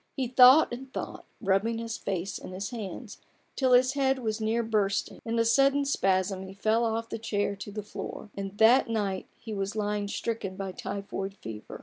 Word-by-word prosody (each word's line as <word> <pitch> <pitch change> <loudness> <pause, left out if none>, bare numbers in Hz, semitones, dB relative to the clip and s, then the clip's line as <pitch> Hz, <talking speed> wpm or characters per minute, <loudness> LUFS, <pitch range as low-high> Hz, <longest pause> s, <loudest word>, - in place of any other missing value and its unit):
He 265 - 0
thought 255 +3 +7
and 260 +2 -7
thought, - - -6
rubbing 200 +4 +1
his 230 0 -4
face 195 0 -3
in 185 - -9
his 195 +4 -4
hands, 220 0 -7 0.4
till 260 -2 +3
his 255 +1 +5
head 270 -1 +2
was 220 -3 -3
near 225 +2 +1
bursting: 210 -3 -1
in 230 0 -2
a 230 - +3
sudden 275 +4 +4
spasm 190 -6 +1
he 190 0 -9
fell 220 +3 +2
off 225 0 -2
the - - -4
chair 205 -2 -1
to 205 - -7
the 210 +1 -5
floor; 210 +1 -7
and 195 0 -6
that 230 +3 +5
night 200 -4 -1
he 220 - -7
was 200 +1 -3
lying 210 -1 -1
stricken 205 -2 -3
by 195 -1 -4
typhoid 195 +1 -5
fever. 110 - -8
215 Hz, 195 wpm, -28 LUFS, 195-235 Hz, 0.4 s, thought